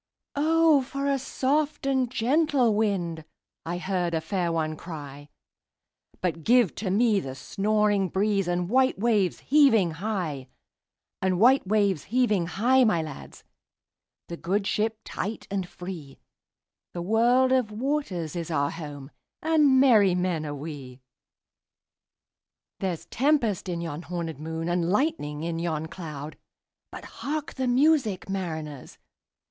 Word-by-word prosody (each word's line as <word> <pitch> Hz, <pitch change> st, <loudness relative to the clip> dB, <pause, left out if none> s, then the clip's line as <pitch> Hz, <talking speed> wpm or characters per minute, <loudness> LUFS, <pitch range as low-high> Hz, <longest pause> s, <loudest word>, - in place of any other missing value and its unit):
"O 315 Hz, 0 st, +4 dB
for 275 Hz, +2 st, -4 dB
a 275 Hz, -1 st, +1 dB
soft 280 Hz, +3 st, -1 dB
and 265 Hz, -3 st, +1 dB
gentle 260 Hz, 0 st, +2 dB
wind!"I 175 Hz, -4 st, -3 dB
heard 180 Hz, -2 st, -1 dB
a -, -, +1 dB
fair 180 Hz, -1 st, -1 dB
one 155 Hz, -1 st, -1 dB
cry:But 150 Hz, +2 st, -9 dB
give 240 Hz, -4 st, +4 dB
to 200 Hz, -1 st, -3 dB
me 210 Hz, +1 st, +3 dB
the 135 Hz, -7 st, -6 dB
snoring 205 Hz, +4 st, +1 dB
breezeAnd 190 Hz, -3 st, 0 dB
white 260 Hz, +5 st, +2 dB
waves 210 Hz, -4 st, +1 dB
heaving 245 Hz, -, +4 dB
high; 160 Hz, -7 st, -3 dB, 0.7 s
And 185 Hz, -2 st, +1 dB
white 250 Hz, 0 st, +5 dB
waves 200 Hz, -5 st, +1 dB
heaving 215 Hz, -7 st, +1 dB
high, 245 Hz, +9 st, +3 dB
my 175 Hz, -8 st, +2 dB
lads, 155 Hz, -3 st, -10 dB, 0.8 s
The 170 Hz, -, -6 dB
good 195 Hz, +5 st, -1 dB
ship 220 Hz, +2 st, 0 dB
tight 215 Hz, +4 st, -5 dB
and 190 Hz, -3 st, -2 dB
free—The 175 Hz, 0 st, -11 dB
world 240 Hz, +6 st, +3 dB
of 255 Hz, -5 st, +2 dB
waters 210 Hz, -, -2 dB
is 170 Hz, -1 st, -4 dB
our 145 Hz, -3 st, 0 dB
home, 145 Hz, -4 st, -8 dB, 0.3 s
And 300 Hz, -4 st, +4 dB
merry 215 Hz, -9 st, +5 dB
men 180 Hz, -4 st, -1 dB
are 145 Hz, -, -4 dB
we. 140 Hz, -4 st, -8 dB, 1.8 s
There's 180 Hz, -4 st, -3 dB
tempest 240 Hz, -, +1 dB
in 170 Hz, -1 st, -3 dB
yon 160 Hz, -2 st, -5 dB
hornèd 170 Hz, -3 st, -5 dB
moon, 160 Hz, +1 st, -4 dB
And 175 Hz, -1 st, 0 dB
lightning 200 Hz, -, -1 dB
in 165 Hz, 0 st, -2 dB
yon 160 Hz, -2 st, -2 dB
cloud:But 155 Hz, -4 st, -11 dB
hark 300 Hz, +1 st, -5 dB
the 260 Hz, -1 st, -2 dB
music, 255 Hz, -, +2 dB
mariners! 160 Hz, -8 st, -5 dB
190 Hz, 125 wpm, -26 LUFS, 165-245 Hz, 1.8 s, white